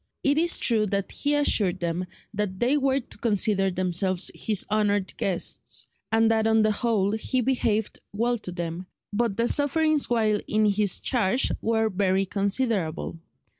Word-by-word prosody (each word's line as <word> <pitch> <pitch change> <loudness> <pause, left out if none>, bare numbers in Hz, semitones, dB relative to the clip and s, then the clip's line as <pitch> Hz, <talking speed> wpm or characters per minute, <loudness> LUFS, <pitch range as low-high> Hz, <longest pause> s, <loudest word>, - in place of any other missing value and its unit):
It 285 +2 +2
is 340 +1 +3
true 220 -3 +2
that 200 -1 -2
he 290 0 0
assured 210 -10 +2
them 175 +1 -2 0.3
that 200 -2 -3
they 250 +4 +2
were 275 -1 +1
to - - -12
consider 205 -3 +1
themselves 185 0 -1
his 210 -4 -1
honoured 205 -2 0
guests, 185 -3 -2 0.3
and 225 0 +3
that 220 0 +2
on 220 0 +3
the 215 - +3
whole 210 -3 0
he 220 +4 -1
behaved 225 -4 0
well 235 +3 0
to 185 - -5
them, 175 +1 -5 0.3
but 225 -2 0
their 230 +1 +2
sufferings 300 +2 +2
while 220 -3 +2
in 215 0 +2
his 205 -1 +2
charge 245 0 +2
were 225 0 +1
very 195 -1 +1
considerable. 195 -5 -1
215 Hz, 160 wpm, -25 LUFS, 195-235 Hz, 0.3 s, is